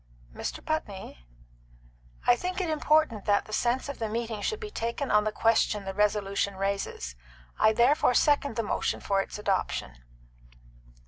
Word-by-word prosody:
"Mr. - - -5
Putney." 200 - -4 1.0
"I 245 - +6
think 365 +7 -3
it 350 -4 -1
important 305 -8 +2
that 205 -1 +2
the 215 - -10
sense 245 +5 +1
of 280 - -6
the 225 -2 -2
meeting 225 -1 -3
should 435 - -1
be 430 -2 -7
taken 235 - -3
on 210 0 +4
the 215 - 0
question 220 -2 +2
the 195 - -4
resolution 200 -1 0
raises. 195 - -3 0.4
I 215 - +5
therefore 245 +3 +3
second 285 -4 +3
the 230 - 0
motion 210 - -1
for 195 -1 +1
its - - -7
adoption." 190 - -2
220 Hz, 155 wpm, -28 LUFS, 200-280 Hz, 1.0 s, I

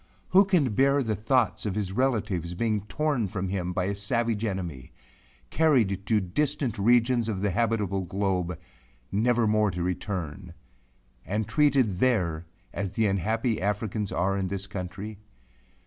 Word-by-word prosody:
Who 195 +2 +6
can 165 - +2
bear 140 +4 +3
the 110 -2 -1
thoughts 110 -3 +1
of 100 - -2
his 100 -3 -2
relatives 105 -8 -1
being 110 +1 0
torn 135 +1 0
from 95 -1 -3
him 90 -2 -2
by 90 0 -1
a 100 +2 -1
savage 115 +2 -1
enemy; 90 - -4 0.6
carried 110 - +2
to 110 -2 +3
distant 130 +4 -1
regions 120 +2 +3
of 95 -4 -2
the 100 -1 +1
habitable 105 -2 0
globe, 90 -2 -1 0.5
never 115 +4 +2
more 105 0 +3
to 90 -2 -3
return; 90 -2 -4 0.7
and 105 +2 -2
treated 130 - +2
there 90 -10 +1 0.3
as 100 -1 -2
the 115 - +1
unhappy 110 +4 0
Africans 105 +1 -2
are 95 +3 0
in 95 -1 -1
this 100 +1 -4
country? 95 +2 -6
105 Hz, 150 wpm, -27 LUFS, 95-115 Hz, 0.7 s, Who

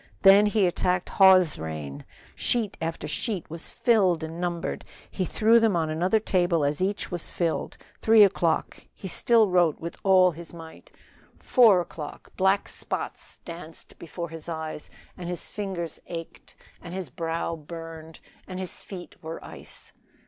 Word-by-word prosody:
Then 200 +2 +8
he 205 -1 +2
attacked 180 0 0
Hawes's 185 -5 +6
reign. 75 -3 -6 0.3
Sheet 225 -5 0
after 165 0 -3
sheet 205 -8 -2
was 165 0 -5
filled 190 -9 +2
and 165 +2 -6
numbered. 175 -1 -3 0.3
He 185 - -2
threw 225 +5 +4
them 225 -4 +3
on 160 -2 0
another 180 +7 +2
table 175 -6 +1
as 145 +4 -1
each 200 +2 -1
was 175 -2 -1
filled. 170 -2 -2 0.2
Three 220 -1 +7
o'clock; 170 -4 0 0.2
still 225 +4 +4
he 195 - -4
wrote 175 -4 +3
with 170 +1 -7
all 185 -2 +5
his 170 +1 -9
might. 165 -1 -12 0.5
Four 220 -8 +5
o'clock; 155 -3 -9
black 190 +1 +2
spots - - -6
danced 165 -2 -10
before 170 +1 -6
his 165 +1 -8
eyes, 160 -2 -5 0.3
and 175 -1 -6
his 180 - -4
fingers 190 -6 -4
ached, 165 -1 -8 0.3
and 175 +1 -8
his 190 -3 -5
brow 165 0 -2
burned, 165 0 -10 0.3
and 185 -1 -6
his 185 -1 -3
feet 180 -3 -10
were 160 +1 -6
ice. - - -7
175 Hz, 155 wpm, -26 LUFS, 165-190 Hz, 0.5 s, Then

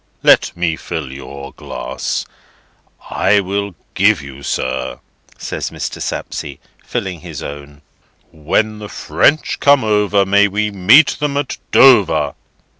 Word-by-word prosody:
Let - - +4
me 85 -2 0
fill 75 -5 -5
your 70 +1 -9
glass. - - -4 0.9
I 100 +1 +3
will 100 0 -3 0.2
give - - +3
you, 70 -1 -10
sir," 65 -1 -3 0.4
says - - -4
Mr. - - -6
Sapsea, 70 -3 -5 0.3
filling 90 -3 -4
his - - -8
own: 70 0 -9 0.5
"When 105 +8 -1
the 105 -1 -8
French 155 - +1
come 140 -2 +4
over, 105 -2 +2
May 100 +1 +4
we 105 +2 -1
meet 110 +10 +6
them 145 -1 -1
at 145 -2 -3
Dover!" 85 - +5
95 Hz, 125 wpm, -17 LUFS, 70-105 Hz, 0.9 s, meet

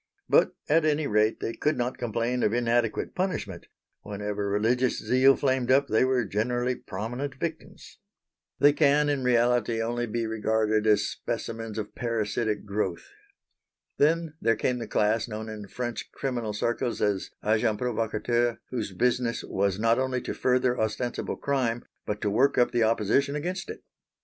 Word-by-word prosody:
But - - +4
at 160 +2 +4
any 155 0 +1
rate 105 -2 +2
they 115 - -2
could 150 +5 0
not 125 +1 -2
complain 120 +1 -1
of 105 - +2
inadequate 120 -1 0
punishment; 150 - -3 0.3
whenever 105 0 -4
religious 115 +5 +1
zeal 130 +2 +4
flamed 130 -2 0
up 140 +1 +4
they 110 - +3
were 130 -2 +2
generally 120 +5 0
prominent 120 +7 -5
victims. 160 +3 -7 0.6
They 145 +2 +5
can 145 0 +3
in 140 -2 0
reality 120 -1 +2
only 120 +1 -1
be 115 +1 -2
regarded 110 0 +1
as 105 -1 +4
specimens 115 -1 -5
of 105 -1 -5
parasitic 110 -2 -2
growth. 100 -4 -3 0.9
Then 160 +1 +2
there 115 0 +3
came 125 +3 -1
the 115 - -5
class 110 +2 +1
known 110 0 -6
in 105 -2 -7
French 120 +3 -5
criminal 120 -5 -3
circles 120 +3 -1
as 100 -2 0 0.2
agents 110 0 +2
provocateurs, 120 0 0
whose 110 -6 -3
business 120 +2 0
was 95 -1 0
not 115 +3 +2
only 130 -1 0
to - - -4
further 125 -1 +1
ostensible 110 +3 -2
crime 125 -4 -1 0.2
but 105 0 -3
to 105 - 0
work 135 +7 +3
up 120 -1 +4
the 120 -1 +1
opposition 115 +6 +2
against 180 +6 -3
it. - - -8
120 Hz, 155 wpm, -27 LUFS, 110-130 Hz, 0.9 s, They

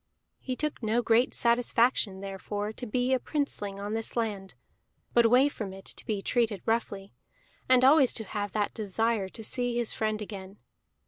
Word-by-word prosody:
He 255 - -4
took 300 0 -2
no 225 +2 +1
great 230 +3 +3
satisfaction, 235 -4 +2
therefore, 205 +2 -4
to 245 - -7
be 250 +4 0
a 260 - +2
princeling 210 -10 -1
on 205 +1 -4
his 225 0 -2
land, 205 -4 -3 0.6
but 235 -1 +5
away 250 +4 +5
from 210 -9 -5
it 195 0 -12
to - - -9
be 205 -4 -2
treated 225 -6 0
roughly, 200 -3 -2 0.6
and 255 0 +6
always 275 -2 +6
to 225 - -3
have 205 -1 -4
that 210 -1 -1
desire 215 -1 -1
to 225 - -9
see 245 +2 -2
his 240 -2 -1
friend 215 -1 -1
again. 200 -2 -8
225 Hz, 175 wpm, -28 LUFS, 205-245 Hz, 0.6 s, and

